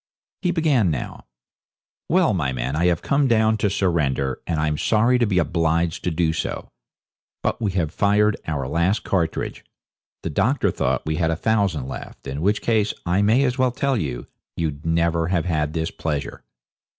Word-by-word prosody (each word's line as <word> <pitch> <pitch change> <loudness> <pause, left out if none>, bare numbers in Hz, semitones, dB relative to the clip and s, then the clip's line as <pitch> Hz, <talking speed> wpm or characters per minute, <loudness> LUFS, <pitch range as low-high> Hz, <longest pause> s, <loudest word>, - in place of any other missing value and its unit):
He 180 - 0
began 155 - +2
now. 70 -6 -4 0.8
'Well, 180 -5 +3
my 75 -8 0
men, 65 +3 -2
I 85 +3 +2
have 85 -3 +1
come 140 0 +2
down 110 -2 +3
to 105 -1 +1
surrender, 75 -9 0
and 80 - -1
I'm 75 0 +1
sorry 115 +3 +3
to 120 - +2
be 95 -3 0
obliged 85 -1 +1
to - - +2
do 80 -1 +1
so. - - -4 0.7
But - - -1
we 100 -4 0
have 85 -4 -1
fired 105 +1 +3
our 70 -5 -2
last 85 - +1
cartridge 85 -4 -2 0.6
the 80 - -3
doctor 110 - +1
thought - - -1
we 80 0 -1
had 80 -1 +1
a 80 - +1
thousand 95 - 0
left 65 -3 -8
in 70 +2 -4
which 105 +4 +1
case, 110 -3 +1
I 90 +3 +2
may 110 +6 +4
as 130 -1 0
well 130 0 +4
tell 135 +2 0
you, 70 - -3 0.3
you'd 75 -1 -3
never 85 0 +1
have 90 -2 0
had 75 -3 -1
this 80 0 -2
pleasure. 75 -3 -4
85 Hz, 180 wpm, -22 LUFS, 80-110 Hz, 0.8 s, may